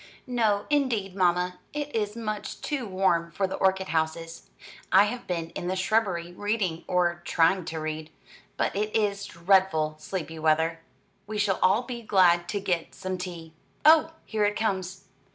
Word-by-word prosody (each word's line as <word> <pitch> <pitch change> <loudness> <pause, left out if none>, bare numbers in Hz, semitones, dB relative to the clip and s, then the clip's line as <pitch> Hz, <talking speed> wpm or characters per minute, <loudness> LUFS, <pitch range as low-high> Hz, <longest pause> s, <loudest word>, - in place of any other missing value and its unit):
"No, 220 -5 +1
indeed, 235 -10 +1
mamma; 180 -1 +1
it 295 -2 -4
is 210 -1 -1
much 215 -2 -4
too 275 -6 -3
warm 185 -3 +1
for 195 +3 -1
the 190 - -4
orchid 190 0 +1
houses. 165 +1 -2 0.4
I 195 - +7
have 240 +4 -4
been 170 -2 -3
in 175 - -5
the 185 - 0
shrubbery 185 -3 0
reading, 200 -4 -1
or 175 -1 +1
trying 170 +2 +2
to 165 -2 -4
read, 155 0 -4 0.5
but - - 0
it 210 +1 -1
is 200 -2 +1
dreadful 170 -3 +2
sleepy 160 -1 -5
weather. 160 +1 +2 0.5
We 215 0 -4
shall 200 -2 +1
all 195 +6 +4
be 245 -1 -6
glad 175 -5 +3
to 205 - -1
get 180 -4 -2
some 185 -1 -4
tea. 170 -3 -7 0.3
Oh, 320 +1 +6
here 215 -2 -1
it 205 0 +2
comes." 190 -3 -2
190 Hz, 165 wpm, -27 LUFS, 170-210 Hz, 0.5 s, I